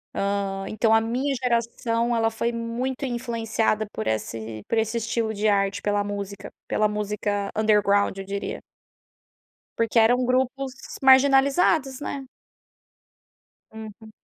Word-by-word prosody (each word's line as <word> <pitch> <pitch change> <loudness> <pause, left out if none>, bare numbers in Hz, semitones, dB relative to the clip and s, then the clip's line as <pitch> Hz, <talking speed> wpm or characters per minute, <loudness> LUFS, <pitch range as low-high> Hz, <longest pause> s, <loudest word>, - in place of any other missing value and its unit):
Hã, 195 -1 -1
então 220 +1 +2
a 225 - +6
minha 250 +5 -1
geração 235 -1 0
ela 225 -1 +1
foi 230 +1 -1
muito 240 +4 -3
influenciada 225 -3 -1
por 110 - -4
esse 110 0 -3
por 230 - 0
esse 225 +1 0
estilo 225 0 -1
de 215 +1 0
arte, 195 -1 +1
pela 205 0 0
música, 200 -1 -6 0.2
pela 215 - +2
música 210 -1 -2
underground, 205 -2 +3
eu 195 - -6
diria. 200 +1 -4 1.2
Porque 230 0 -1
eram 245 +3 +4
grupos 260 +1 0 0.3
marginalizados, 270 +1 +4
né. 275 -2 -5 1.4
Uhum. 220 0 -10
225 Hz, 120 wpm, -24 LUFS, 205-245 Hz, 1.4 s, a